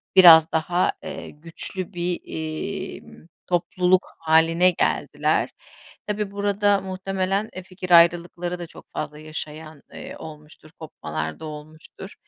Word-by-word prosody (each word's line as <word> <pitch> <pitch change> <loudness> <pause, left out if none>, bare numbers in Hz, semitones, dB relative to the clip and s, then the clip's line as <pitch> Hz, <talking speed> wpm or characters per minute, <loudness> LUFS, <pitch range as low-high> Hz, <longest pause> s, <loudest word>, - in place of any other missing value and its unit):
biraz 165 -4 +9
daha, 175 +3 +1
eee, - - -7
güçlü 170 +4 -5
bir, 175 0 -2
imm, 160 +3 -6 0.2
topluluk 180 +1 +2
hâline 165 +3 +4
geldiler. - - 0 0.6
Tabii, 210 -1 -2
burada 200 0 +1
muhtemelen, 190 +2 -2
eee, 185 - -6
fikir 185 0 -8
ayrılıkları 175 +1 +4
da 175 - -6
çok - - -14
fazla 150 0 -5
yaşayan, 155 -1 -7
eee, - - -8
olmuştur, 150 0 -12
kopmalarda 80 - -5
olmuştur. 155 +5 -10
175 Hz, 110 wpm, -23 LUFS, 155-185 Hz, 0.6 s, biraz